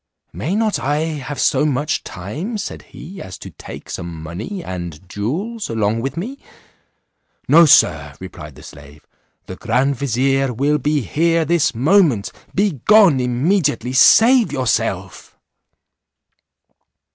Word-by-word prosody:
"May 130 - -3
not 215 -7 0
I 145 +2 -1
have 150 -4 -5
so - - +2
much 150 0 -1
time," 145 - -6
said 200 - -6
he, 180 +6 -10
"as 95 +1 -9
to - - -11
take - - -11
some 85 0 -6
money 105 - -6
and 85 -2 -7
jewels 170 - -4
along 110 0 -1
with 135 +4 -4
me?" 250 +11 -5 1.1
``No, 165 +1 +6
Sir," - - +3
replied - - -10
the - - -14
slave, 70 +1 -14 0.4
"the - - -9
grand 135 +4 0
vizier, 135 +1 0
will 145 +5 0
be 150 +2 0
here 165 - 0
this 160 -4 +1
moment; 140 - +2 0.2
be 190 - 0
gone 205 -10 +6
immediately, 130 +2 0
save 230 - +5
yourself." 130 -4 -3
140 Hz, 130 wpm, -18 LUFS, 115-170 Hz, 1.1 s, ``No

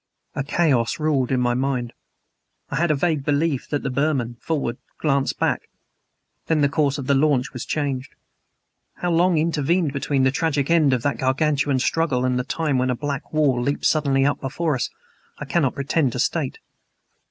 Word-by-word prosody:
A 140 - -2
chaos 140 -6 +1
ruled 145 -5 +1
in 130 - +2
my 120 -1 +2
mind. 125 -2 -1 0.8
I - - -1
had 170 +3 +2
a 155 - +3
vague 150 -1 0
belief 145 -1 0
that 145 - -2
the 135 - -2
Burman, 130 -4 0
forward, 140 -7 -2 0.2
glanced 140 -3 0
back. - - -1 0.8
Then 160 -2 +2
the 140 - +3
course 145 -1 +1
of 140 - -5
the 140 - +2
launch 140 -2 +2
was 125 - -6
changed. 140 -4 -2 0.8
How 175 - -2
long 170 +1 +3
intervened 160 0 +1
between 140 -1 0
the 130 - +4
tragic 145 0 0
end 155 -5 +4
of 125 -3 0
that 145 - -1
Gargantuan 140 +1 +1
struggle 130 -2 +1
and 125 -1 +1
the - - -1
time 145 -1 -1
when 130 +1 +1
a 125 - +1
black 145 +2 -4
wall 145 -5 +2
leaped 140 +4 -1
suddenly 140 -3 +2
up 145 - 0
before 155 +4 -1
us 125 -3 -1 0.5
I 150 - -6
cannot 135 -1 +1
pretend 140 -1 0
to - - -4
state. - - -1
140 Hz, 185 wpm, -22 LUFS, 130-155 Hz, 0.8 s, the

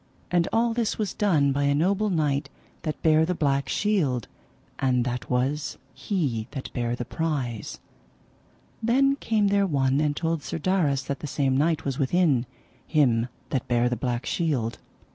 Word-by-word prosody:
And 175 -1 +3
all 230 0 +2
this 230 -2 -1
was 210 -3 -2
done 155 -9 +2
by 140 +1 0
a 140 0 +3
noble 195 +7 +2
knight 145 -5 0 0.3
that 155 -2 -3
bare 155 0 +5
the 180 +3 0
black 140 -4 0
shield, 150 - +1 0.5
and 125 -2 +2
that 125 0 -3
was 135 +4 -1 0.2
he 135 - -2
that 135 -3 -6
bare 120 -1 -1
the 120 - -5
prize. 135 -8 -3 1.0
Then 270 +5 +3
came 215 -6 +1
there 200 0 +3
one 135 -3 +2
and 150 -1 +1
told 165 -1 -1
Sir 145 - -4
Darras 155 -6 +1
that 140 - -3
the 150 - -5
same 135 -1 0
knight 160 +3 +1
was 135 0 -2
within, 140 -4 +2 0.4
him 125 -7 +3 0.2
that 130 - -1
bare 120 0 +2
the 125 - 0
black 120 +1 -2
shield. 135 -10 -1
145 Hz, 165 wpm, -26 LUFS, 130-175 Hz, 1.0 s, bare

